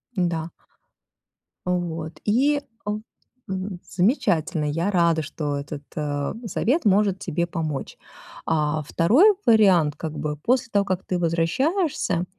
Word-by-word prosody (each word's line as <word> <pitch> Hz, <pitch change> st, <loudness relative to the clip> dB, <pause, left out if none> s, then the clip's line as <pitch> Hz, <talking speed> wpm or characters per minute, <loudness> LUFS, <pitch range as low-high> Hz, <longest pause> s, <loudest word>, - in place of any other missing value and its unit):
Да. 170 Hz, -3 st, -1 dB, 1.2 s
Вот 170 Hz, -3 st, -3 dB
и 280 Hz, +7 st, +3 dB, 0.2 s
о 210 Hz, 0 st, -2 dB, 0.5 s
м 190 Hz, -1 st, -4 dB
замечательно. 175 Hz, -, +1 dB
Я 165 Hz, +7 st, 0 dB
рада, 170 Hz, -3 st, +3 dB
что 145 Hz, -1 st, -3 dB
этот, 145 Hz, +1 st, -6 dB
э, 145 Hz, -2 st, -2 dB
совет 255 Hz, -, 0 dB
может 200 Hz, -1 st, +3 dB
тебе 170 Hz, -2 st, -2 dB
помочь. 155 Hz, -5 st, -4 dB, 0.5 s
А, 155 Hz, -1 st, 0 dB
2 250 Hz, -, +5 dB
вариант, 190 Hz, -, +5 dB
как 155 Hz, -1 st, -5 dB
бы 150 Hz, 0 st, -3 dB
после 250 Hz, -, +1 dB
того 200 Hz, -1 st, +2 dB
как 185 Hz, -1 st, -2 dB
ты 180 Hz, -, -2 dB
возвращаешься, 180 Hz, -, 0 dB
175 Hz, 120 wpm, -24 LUFS, 155-205 Hz, 1.2 s, 2